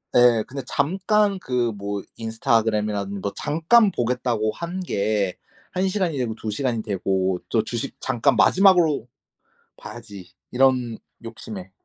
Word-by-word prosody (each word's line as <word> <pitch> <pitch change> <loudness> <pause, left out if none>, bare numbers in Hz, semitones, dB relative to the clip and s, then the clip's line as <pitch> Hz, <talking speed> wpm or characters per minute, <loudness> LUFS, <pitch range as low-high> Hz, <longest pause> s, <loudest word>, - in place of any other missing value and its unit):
예 120 -3 +5
근데 135 +1 -6
잠깐 195 +6 +1
그 125 -7 -1
뭐 100 0 -4
인스타그램이라든 110 -3 0
뭐 100 +1 -3
잠깐 195 +8 +3
보겠다고 120 - -1
한 170 +2 -5
게 100 - 0 0.4
1 185 +1 0
시간이 185 -5 -1
되고 115 -3 -2
2 110 -1 -5
시간이 115 -1 -1
되고 95 -2 -1
또 110 - +2
'주식 115 +1 -4
잠깐 130 +1 +1
마지막으로 175 - +4 0.7
봐야지.' 100 -7 -11 0.2
이런 125 -3 +2 0.3
욕심에 105 -4 -8
115 Hz, 265 characters per minute, -23 LUFS, 105-150 Hz, 0.7 s, 예